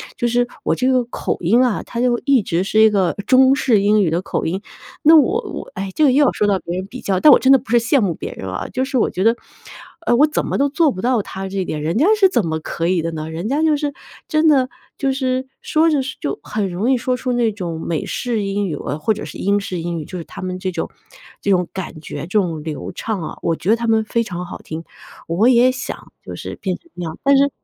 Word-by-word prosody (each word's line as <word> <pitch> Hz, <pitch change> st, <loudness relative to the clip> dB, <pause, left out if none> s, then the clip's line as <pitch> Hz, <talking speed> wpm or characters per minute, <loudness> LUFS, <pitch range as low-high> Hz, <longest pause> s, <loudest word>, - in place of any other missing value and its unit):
就 240 Hz, -, -1 dB
是 245 Hz, +1 st, +1 dB, 0.2 s
我 -, -, +1 dB
这 255 Hz, +1 st, +1 dB
个 255 Hz, -1 st, +3 dB
口 240 Hz, -, -3 dB
音 210 Hz, +9 st, +4 dB
啊， 240 Hz, -5 st, 0 dB
它 235 Hz, -, -6 dB
就 240 Hz, -1 st, +2 dB
一 275 Hz, -6 st, +4 dB
直 175 Hz, -1 st, 0 dB
是 215 Hz, +2 st, +1 dB
一 220 Hz, -, +7 dB
个 190 Hz, -4 st, +1 dB
中 260 Hz, +3 st, +5 dB
式 235 Hz, -7 st, +2 dB
英 205 Hz, +1 st, +4 dB
语 175 Hz, -, +1 dB
的 170 Hz, +2 st, 0 dB
口 -, -, -3 dB
音。 185 Hz, +4 st, -2 dB, 0.4 s
那 315 Hz, +2 st, +7 dB
我 395 Hz, -, +3 dB
我 -, -, -7 dB
唉， 195 Hz, +1 st, -4 dB
这 310 Hz, -, +2 dB
个 280 Hz, -, +6 dB
又 285 Hz, +3 st, +4 dB
要 -, -, +3 dB
说 210 Hz, -, 0 dB
到 195 Hz, -2 st, +2 dB
别 175 Hz, -, -5 dB
人 185 Hz, -, -3 dB
比 255 Hz, +5 st, -9 dB
较 190 Hz, -2 st, 0 dB
但 300 Hz, -, +7 dB
我 -, -, +6 dB
真 260 Hz, -, +4 dB
的 270 Hz, -, +8 dB
不 245 Hz, -2 st, -10 dB
是 240 Hz, -, +5 dB
羡 235 Hz, +5 st, +2 dB
慕 195 Hz, -7 st, +1 dB
别 -, -, -6 dB
人 95 Hz, -, -7 dB
啊， 95 Hz, -, -4 dB
就 260 Hz, +1 st, -1 dB
是 265 Hz, -1 st, -2 dB
我 -, -, +2 dB
觉 185 Hz, -, -2 dB
得， 225 Hz, +2 st, +4 dB, 0.7 s
呃， 240 Hz, -, +3 dB
我 290 Hz, +5 st, +5 dB
怎 305 Hz, -, -1 dB
么 -, -, -1 dB
都 280 Hz, +1 st, +3 dB
做 305 Hz, +1 st, +2 dB
不 185 Hz, -, -6 dB
到 245 Hz, -1 st, +2 dB
他 195 Hz, 0 st, -6 dB
这 195 Hz, -, -5 dB
一 190 Hz, -, 0 dB
点， 155 Hz, -3 st, -4 dB
人 160 Hz, +6 st, -1 dB
家 290 Hz, -, +4 dB
是 385 Hz, -2 st, +6 dB
怎 240 Hz, -, +1 dB
么 160 Hz, 0 st, -2 dB
可 165 Hz, +1 st, -3 dB
以 180 Hz, -1 st, +2 dB
的 165 Hz, +1 st, -3 dB
呢？ 155 Hz, 0 st, -5 dB
人 170 Hz, +5 st, -4 dB
家 285 Hz, +3 st, +1 dB
就 315 Hz, -1 st, +3 dB
是 290 Hz, -1 st, -2 dB, 0.3 s
真 310 Hz, 0 st, +2 dB
的， 265 Hz, -4 st, +4 dB, 0.3 s
就 275 Hz, -1 st, 0 dB
是 260 Hz, -1 st, 0 dB, 0.2 s
说 320 Hz, +1 st, +2 dB
着 295 Hz, -3 st, +2 dB
说 260 Hz, 0 st, -6 dB
就 140 Hz, -, -3 dB
很 210 Hz, -3 st, -2 dB
容 195 Hz, +8 st, 0 dB
易 260 Hz, -, +3 dB
说 250 Hz, +1 st, -1 dB
出 255 Hz, 0 st, -2 dB
那 240 Hz, -2 st, +2 dB
种 175 Hz, -6 st, -5 dB
美 165 Hz, -3 st, -2 dB
式 230 Hz, -4 st, -2 dB
英 200 Hz, 0 st, -1 dB
语 160 Hz, -, -3 dB
啊， 145 Hz, -, -4 dB
或 185 Hz, +8 st, +1 dB
者 210 Hz, -, -7 dB
是 -, -, -9 dB
英 200 Hz, +1 st, +1 dB
式 185 Hz, -3 st, -4 dB
英 170 Hz, 0 st, -3 dB
语， -, -, -5 dB
就 185 Hz, -, -7 dB
是 170 Hz, -, -5 dB
他 -, -, -10 dB
们 185 Hz, 0 st, -4 dB
这 185 Hz, 0 st, -2 dB
种 -, -, -4 dB, 0.5 s
这 -, -, -2 dB
种 180 Hz, -2 st, +2 dB
感 185 Hz, -4 st, -6 dB
觉， -, -, -7 dB
这 -, -, -6 dB
种 165 Hz, -5 st, -2 dB
流 155 Hz, -2 st, -5 dB
畅 215 Hz, -5 st, -3 dB
啊。 160 Hz, -, -6 dB
我 165 Hz, -, 0 dB
觉 180 Hz, -, -4 dB
得 220 Hz, -, +6 dB
他 235 Hz, 0 st, -3 dB
们 220 Hz, -1 st, +3 dB
非 230 Hz, +2 st, 0 dB
常 180 Hz, -4 st, -5 dB
好 175 Hz, -, -8 dB
听， 160 Hz, +1 st, -7 dB, 0.4 s
我 180 Hz, +8 st, +2 dB
也 250 Hz, +1 st, +5 dB
想 255 Hz, 0 st, -7 dB
就 -, -, -7 dB
是 -, -, -7 dB
变 185 Hz, -2 st, -1 dB
成 340 Hz, -, -27 dB
那 175 Hz, -, -5 dB
样， 160 Hz, 0 st, -6 dB
但 275 Hz, 0 st, +5 dB
是 280 Hz, +1 st, +4 dB
215 Hz, 300 characters per minute, -19 LUFS, 180-260 Hz, 0.7 s, 的